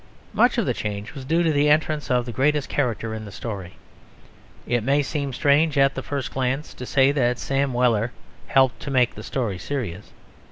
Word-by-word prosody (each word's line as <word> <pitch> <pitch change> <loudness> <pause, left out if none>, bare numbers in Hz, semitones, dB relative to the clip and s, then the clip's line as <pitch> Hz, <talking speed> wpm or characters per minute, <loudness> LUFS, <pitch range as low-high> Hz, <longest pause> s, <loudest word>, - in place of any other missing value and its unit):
Much - - +3
of - - +1
the - - +1
change 105 0 -5
was 135 -3 -8
due 165 +5 +2
to 165 - +2
the 145 +1 +3
entrance 155 0 +1
of 125 -2 +2
the 120 - -5
greatest 145 +4 +1
character 115 -5 -1
in 110 0 -5
the 105 - -9
story. 100 -3 -6 0.9
It 120 -1 0
may 140 +5 +2
seem 140 -1 -3
strange 145 +4 +2
at 135 0 +4
the 135 - -4
first 135 -5 -4
glance 135 +3 -2
to 125 - -8
say 135 0 +4
that 125 -4 +1
Sam 135 +1 0
Weller 120 -2 +2 0.4
helped 130 -4 +3
to 140 - -6
make 125 -3 +2
the - - -9
story 110 -9 -3
serious. 105 - -5
130 Hz, 200 wpm, -23 LUFS, 115-145 Hz, 0.9 s, at